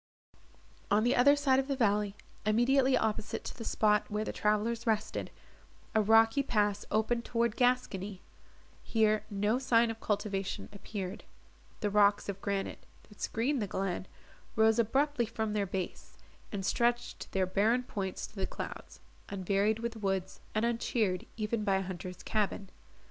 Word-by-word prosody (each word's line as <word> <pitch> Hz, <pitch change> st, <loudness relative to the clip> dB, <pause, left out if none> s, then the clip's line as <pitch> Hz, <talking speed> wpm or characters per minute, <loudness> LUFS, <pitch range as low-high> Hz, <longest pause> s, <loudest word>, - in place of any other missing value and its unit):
On 210 Hz, +1 st, +3 dB
the 245 Hz, -, +3 dB
other 285 Hz, +4 st, +6 dB
side 275 Hz, -2 st, +3 dB
of 270 Hz, -, -1 dB
the 275 Hz, -, 0 dB
valley, 210 Hz, -4 st, +1 dB, 0.3 s
immediately 255 Hz, +5 st, +3 dB
opposite 220 Hz, -1 st, -2 dB
to -, -, -6 dB
the 230 Hz, -, -7 dB
spot 210 Hz, -1 st, +2 dB
where 210 Hz, +1 st, -2 dB
the -, -, -4 dB
travellers 225 Hz, +3 st, 0 dB
rested, 215 Hz, -1 st, 0 dB, 0.6 s
a 220 Hz, -, +4 dB
rocky 225 Hz, +5 st, +5 dB
pass 210 Hz, -6 st, 0 dB
opened 225 Hz, +2 st, +1 dB
toward 235 Hz, -2 st, 0 dB
Gascony. 210 Hz, -6 st, 0 dB, 0.6 s
Here 215 Hz, -1 st, +2 dB
no 205 Hz, +4 st, +1 dB
sign 235 Hz, -3 st, +3 dB
of 225 Hz, -, -8 dB
cultivation 200 Hz, -2 st, -2 dB
appeared. 200 Hz, -1 st, -6 dB, 0.6 s
The 205 Hz, -, 0 dB
rocks 205 Hz, 0 st, +4 dB
of 200 Hz, -1 st, -4 dB
granite, 200 Hz, -1 st, -3 dB, 0.3 s
that 210 Hz, -, -16 dB
screened 250 Hz, +3 st, 0 dB
the 205 Hz, -, -1 dB
glen, 190 Hz, -1 st, -2 dB, 0.5 s
rose 220 Hz, +1 st, +4 dB
abruptly 265 Hz, +2 st, +2 dB
from 220 Hz, -1 st, -2 dB
their 205 Hz, -2 st, 0 dB
base, 185 Hz, -1 st, -5 dB, 0.3 s
and 195 Hz, -2 st, -3 dB
stretched 240 Hz, +2 st, 0 dB
their 190 Hz, -1 st, +1 dB
barren 215 Hz, +7 st, +2 dB
points 195 Hz, -6 st, -4 dB
to -, -, -16 dB
the -, -, -2 dB
clouds, -, -, -7 dB, 0.3 s
unvaried 200 Hz, +2 st, +1 dB
with 235 Hz, 0 st, -4 dB
woods, 195 Hz, -3 st, -2 dB, 0.2 s
and 215 Hz, +2 st, +2 dB
uncheered 225 Hz, -5 st, 0 dB
even 215 Hz, 0 st, -1 dB
by 195 Hz, -2 st, +2 dB
a 190 Hz, -, 0 dB
hunter's 180 Hz, -1 st, -7 dB
cabin. 205 Hz, -2 st, -1 dB
215 Hz, 155 wpm, -31 LUFS, 200-235 Hz, 0.6 s, other